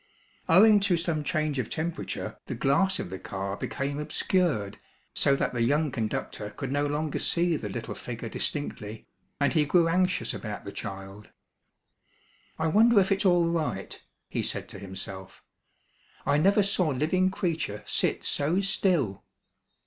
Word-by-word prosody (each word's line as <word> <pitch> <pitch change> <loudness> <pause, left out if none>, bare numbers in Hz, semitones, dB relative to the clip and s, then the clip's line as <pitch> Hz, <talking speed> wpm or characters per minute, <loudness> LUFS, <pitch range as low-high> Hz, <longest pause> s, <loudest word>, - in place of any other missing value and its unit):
Owing 210 +5 +7
to 195 -3 +2
some 165 -3 -1
change 155 -2 0
of 125 - -2
temperature 165 +1 -4
the - - -3
glass 185 +8 +2
of 90 - -5
the 95 - -5
car 95 0 -4
became 140 +6 -3
obscured 150 - 0 0.3
so 140 - +3
that - - -1
the 120 - -1
young 145 +5 +2
conductor 110 -3 -3
could 135 +5 -5
no 145 +1 +1
longer 150 +1 -2
see 170 -1 +1
the 105 -8 -4
little 115 +3 -5
figure 115 -1 -6
distinctly, 110 -4 -4 0.3
and 140 -1 +2
he 155 -3 +4
grew 165 +3 +3
anxious 185 +2 +1
about 105 -2 -6
the 100 - -5
child. 95 0 -7 1.3
"I 160 - -1
wonder 215 +6 +5
if 195 +1 +2
it's 195 +1 +1
all 175 -2 +4
right," 125 - -3 0.3
he - - -2
said - - -3
to 100 - -8
himself. 95 0 -8 0.8
"I 145 - +3
never 200 +5 +4
saw 190 -3 +1
living 155 +7 +2
creature 165 - -2
sit - - 0
so 155 +6 +1
still." 180 - +1
150 Hz, 155 wpm, -28 LUFS, 110-175 Hz, 1.3 s, Owing